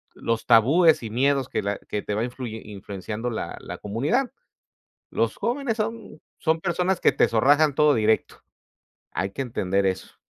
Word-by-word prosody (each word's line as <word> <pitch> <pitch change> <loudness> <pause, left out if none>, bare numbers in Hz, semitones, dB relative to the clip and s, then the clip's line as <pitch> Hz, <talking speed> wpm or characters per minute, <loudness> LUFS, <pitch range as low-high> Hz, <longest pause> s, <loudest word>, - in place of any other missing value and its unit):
los 115 -1 -2
tabúes 145 +9 +5
y 110 - -4
miedos 135 +2 +1
que - - -2
la 100 0 -2
que 105 - -5
te 105 - -4
va 110 +3 0
influye 120 -3 -6
influenciando 105 +3 -6
la 115 - -4
la - - -7
comunidad. 145 - -1 0.8
Los - - 0
jóvenes 240 -1 -1
son 220 -6 -4 0.2
son 160 0 +1
personas 180 +1 0
que - - +4
te - - +3
zorrajan 145 +6 +4
todo 150 0 +4
directo, 110 -1 0 0.7
hay 95 - -2
que 135 - -5
entender 100 -5 -1
eso. 95 0 -3
125 Hz, 165 wpm, -24 LUFS, 110-160 Hz, 0.8 s, tabúes